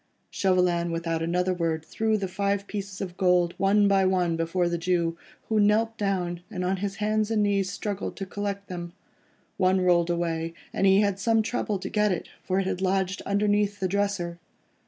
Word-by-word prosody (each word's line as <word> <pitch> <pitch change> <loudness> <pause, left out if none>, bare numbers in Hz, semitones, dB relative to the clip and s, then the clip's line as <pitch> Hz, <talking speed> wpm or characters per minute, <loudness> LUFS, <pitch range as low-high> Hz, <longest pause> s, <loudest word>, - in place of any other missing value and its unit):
Chauvelin 180 -3 +2
without 165 -1 -2
another 180 +2 +1
word 165 -2 -2
threw 220 +3 0
the 195 -2 -2
five 200 +1 -1
pieces 200 -2 -6
of 180 -2 -5
gold 180 -2 +3
one 200 +1 +4
by 195 -1 +4
one 180 -3 +2
before 165 +2 0
the 170 0 -1
Jew, 170 -1 0 0.3
who 220 -1 +1
knelt 220 +2 +3
down, 180 -4 -1
and 180 -1 -3
on 190 +1 0
his 195 +1 -3
hands 215 +1 0
and 215 -2 +2
knees 195 -2 +1
struggled 200 +1 -4
to 195 - -5
collect 200 0 -4
them. 175 -1 -6 0.6
One 185 0 +3
rolled 175 -1 +3
away, 165 -1 -1 0.2
and 195 - +2
he 195 +1 +6
had 200 -2 0
some 225 +1 +2
trouble 225 -3 -1
to 190 +1 -6
get 210 -1 +1
it, 180 - -3
for 185 +1 0
it 195 - 0
had 185 -1 -2
lodged 190 0 0
underneath 205 0 +1
the 190 - 0
dresser. 195 -3 -1
190 Hz, 190 wpm, -26 LUFS, 175-205 Hz, 0.6 s, he